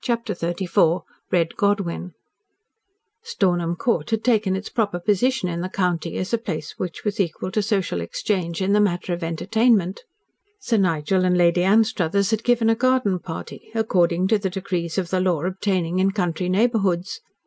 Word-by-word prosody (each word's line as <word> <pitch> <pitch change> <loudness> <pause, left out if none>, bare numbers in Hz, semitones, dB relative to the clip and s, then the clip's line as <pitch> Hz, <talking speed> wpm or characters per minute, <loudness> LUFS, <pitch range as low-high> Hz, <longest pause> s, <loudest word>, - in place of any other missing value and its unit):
CHAPTER 230 -3 -1
XXXIV 175 0 +1 0.3
RED 170 -2 +1
GODWYN 195 -3 -1 1.1
Stornham 175 - 0
Court 170 -6 -1
had 225 -1 -1
taken 215 -6 +2
its 195 +2 -5
proper 205 -6 -1
position 210 +4 +1
in 170 -1 -3
the 185 - -3
county 180 -3 -1
as 185 - -4
a 235 - +2
place 155 -8 -5
which 180 +2 -5
was 210 -1 -2
equal 185 0 -2
to 215 - +1
social 195 - -1
exchange 170 - -2
in 195 +2 +1
the 210 - +4
matter 180 -2 0
of 170 0 -4
entertainment. 195 +3 +1 0.6
Sir 235 - 0
Nigel 185 -1 +1
and 180 -1 +2
Lady 175 0 +3
Anstruthers 200 -1 +2
had 220 0 0
given 240 -2 +2
a 225 - +5
garden 250 -6 +1
party, 165 +4 -8
according 180 -5 +2
to 220 - +3
the 195 -1 -2
decrees 180 -3 -3
of 180 -2 -2
the 185 -1 +1
law 175 -5 +1
obtaining 185 -2 -1
in 190 +1 +3
country 180 -3 -1
neighbourhoods. 195 -3 +1
185 Hz, 170 wpm, -22 LUFS, 175-210 Hz, 1.1 s, a